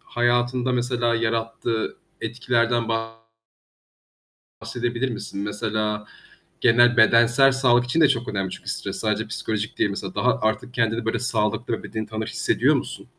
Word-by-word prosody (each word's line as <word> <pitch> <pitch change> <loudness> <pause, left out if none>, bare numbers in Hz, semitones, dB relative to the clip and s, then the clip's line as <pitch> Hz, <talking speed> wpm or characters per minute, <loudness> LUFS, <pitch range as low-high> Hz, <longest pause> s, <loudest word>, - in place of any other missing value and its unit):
hayatında 120 +1 0
mesela 120 -1 0
yarattığı 115 0 -2 0.2
etkilerden 120 0 0 1.7
bahsedebilir 120 +2 -2
misin? 105 -3 -6
Mesela 105 0 -2 0.5
genel 120 +1 +5
bedensel 120 +4 +5
sağlık 125 -2 +3
için 125 +7 0
de 150 - +6
çok 120 -2 -1
önemli 95 -2 -2
çünkü - - -7
stres - - -4
sadece 110 0 -1
psikolojik 110 -1 -4
değil. 100 - +2
Mesela 100 -2 -5
daha 125 -1 +1
artık 120 +3 -1
kendini, 115 -1 0
böyle, 115 +1 0
sağlıklı 115 -1 -1
ve - - -6
bedeni 110 -1 -5
tanır 110 0 -4
hissediyor - - +1
musun? - - -6
115 Hz, 135 wpm, -23 LUFS, 110-120 Hz, 1.7 s, de